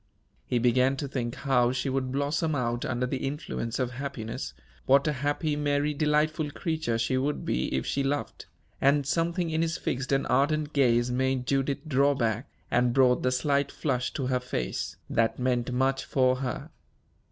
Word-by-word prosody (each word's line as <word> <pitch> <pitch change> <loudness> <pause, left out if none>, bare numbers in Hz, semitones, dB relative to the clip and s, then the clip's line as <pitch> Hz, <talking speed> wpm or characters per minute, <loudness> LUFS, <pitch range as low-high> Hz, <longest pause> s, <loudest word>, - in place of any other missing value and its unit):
He 125 - +1
began 125 +3 +3
to 140 - -3
think 120 -3 -3
how 125 -3 +2
she 130 +1 -2
would 130 -1 -1
blossom 145 +3 0
out 120 -2 -1
under 125 0 -1
the 130 +1 -3
influence 130 -4 -4
of 125 -2 -1
happiness; 115 - -5 0.3
what 140 +2 +5
a 150 - +2
happy, 145 +2 -1
merry, 145 0 +1
delightful 150 +1 +1
creature 155 -6 -2
she 115 +3 0
would 145 +3 -2
be 65 - -1
if 65 - -1
she 140 - 0
loved; 140 +1 -3 0.3
and 140 +1 +4
something 170 +3 0
in 160 +1 +1
his 165 -1 0
fixed 135 +2 -3
and 135 0 +2
ardent 150 +1 +1
gaze 120 -3 +3
made 130 0 0
Judith 135 +3 -1
draw 140 0 +3
back, 115 +1 -1 0.2
and 125 0 +3
brought 125 -2 +4
the 125 - +1
slight 140 +2 +1
flush 125 0 -1
to 135 - -2
her 125 0 +1
face, 125 - -3
that 115 0 +1
meant 125 -1 0
much 135 +2 +1
for 130 -1 +2
her. 130 -3 -4
135 Hz, 175 wpm, -28 LUFS, 125-145 Hz, 0.3 s, what